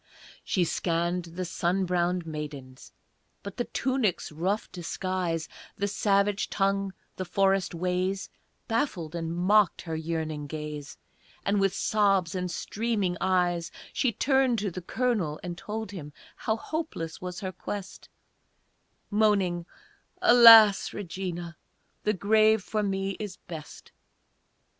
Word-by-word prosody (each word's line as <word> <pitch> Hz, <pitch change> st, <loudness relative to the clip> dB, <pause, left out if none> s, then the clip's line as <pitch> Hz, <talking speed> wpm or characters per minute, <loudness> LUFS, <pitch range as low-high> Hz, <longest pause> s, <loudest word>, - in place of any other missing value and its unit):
She 185 Hz, -, +1 dB
scanned 170 Hz, +1 st, -1 dB
the 175 Hz, +2 st, -5 dB
sun 180 Hz, +2 st, 0 dB
browned 175 Hz, 0 st, 0 dB
maidens; 145 Hz, -5 st, -7 dB, 0.5 s
But 200 Hz, -1 st, -8 dB
the 240 Hz, -, -1 dB
tunic's 255 Hz, -11 st, -1 dB
rough 185 Hz, +7 st, -1 dB
disguise, 175 Hz, -2 st, -2 dB, 0.3 s
The 200 Hz, -, 0 dB
savage 200 Hz, 0 st, +1 dB
tongue, 195 Hz, 0 st, 0 dB, 0.2 s
the 185 Hz, -, -2 dB
forest 195 Hz, 0 st, +1 dB
ways, 185 Hz, +2 st, -1 dB, 0.4 s
Baffled 215 Hz, -, -1 dB
and 165 Hz, -1 st, -3 dB
mocked 190 Hz, +3 st, +3 dB
her 165 Hz, -2 st, -4 dB
yearning 160 Hz, -2 st, -3 dB
gaze, 150 Hz, -1 st, -6 dB, 0.5 s
And 200 Hz, 0 st, +2 dB
with 195 Hz, -1 st, +2 dB
sobs 195 Hz, -5 st, +2 dB
and 180 Hz, -1 st, -2 dB
streaming 205 Hz, -1 st, -1 dB
eyes 175 Hz, -2 st, +1 dB, 0.2 s
She 260 Hz, -4 st, +1 dB
turned 265 Hz, +1 st, +2 dB
to 200 Hz, -2 st, -2 dB
the 185 Hz, -, -6 dB
Colonel 200 Hz, -7 st, -1 dB
and 175 Hz, -1 st, -4 dB
told 210 Hz, +3 st, -5 dB
him 150 Hz, -7 st, -8 dB, 0.2 s
How 220 Hz, 0 st, -1 dB
hopeless 265 Hz, -, -5 dB
was 180 Hz, +2 st, -5 dB
her 190 Hz, -2 st, -3 dB
quest 200 Hz, +1 st, -7 dB, 1.0 s
Moaning, 200 Hz, -5 st, +2 dB, 0.5 s
"Alas, 230 Hz, -, +8 dB
Regina! 175 Hz, -3 st, -5 dB, 0.5 s
The 210 Hz, -, +3 dB
grave 215 Hz, +1 st, +4 dB
for 215 Hz, +1 st, -1 dB
me 195 Hz, -1 st, -1 dB
is 205 Hz, -4 st, -5 dB
best!" 160 Hz, -3 st, -10 dB
185 Hz, 125 wpm, -28 LUFS, 170-205 Hz, 1.0 s, Alas